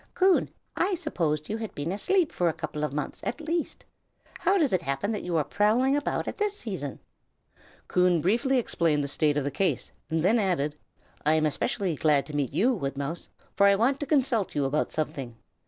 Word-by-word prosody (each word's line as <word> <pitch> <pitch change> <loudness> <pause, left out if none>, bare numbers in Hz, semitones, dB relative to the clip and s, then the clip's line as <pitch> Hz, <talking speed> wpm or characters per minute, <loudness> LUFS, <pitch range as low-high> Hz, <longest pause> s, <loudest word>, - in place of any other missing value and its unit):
"Coon, 375 -1 +3 0.3
I 370 +2 +1
supposed 165 - -2
you 220 - -2
had 225 -1 -6
been 145 +4 -3
asleep 350 - +1
for 175 -1 +1
a - - -1
couple 150 -1 -5
of 150 - -1
months, 150 +1 -4
at 245 - -3
least. 325 +1 -3 0.5
How 395 - +3
does 300 - +2
it 185 - +2
happen 140 +7 -2
that 210 - -2
you 175 -2 -1
are 155 - +2
prowling 230 - +2
about 290 - -1
at - - -5
this 415 -1 0
season?" 185 - -5 0.9
Coon 180 -2 +3
briefly 240 - +2
explained 165 -10 +1
the - - -2
state 145 +1 +2
of 145 - +1
the 140 - -2
case, 165 -1 -1 0.2
and 160 0 0
then 220 +6 +4
added: 165 -7 0 0.5
"I 155 - +4
am 155 -1 +3
specially 185 +4 0
glad 150 -1 +2
to 150 - -7
meet 145 -3 0
you, 250 +6 +2
Woodmouse, 140 - -4 0.3
for 200 - +5
I 200 - +5
want 255 +7 +2
to 290 - -4
consult 250 - +1
you 145 -2 +1
about 145 +3 0
something. 135 -6 -3
180 Hz, 205 wpm, -27 LUFS, 150-245 Hz, 0.9 s, for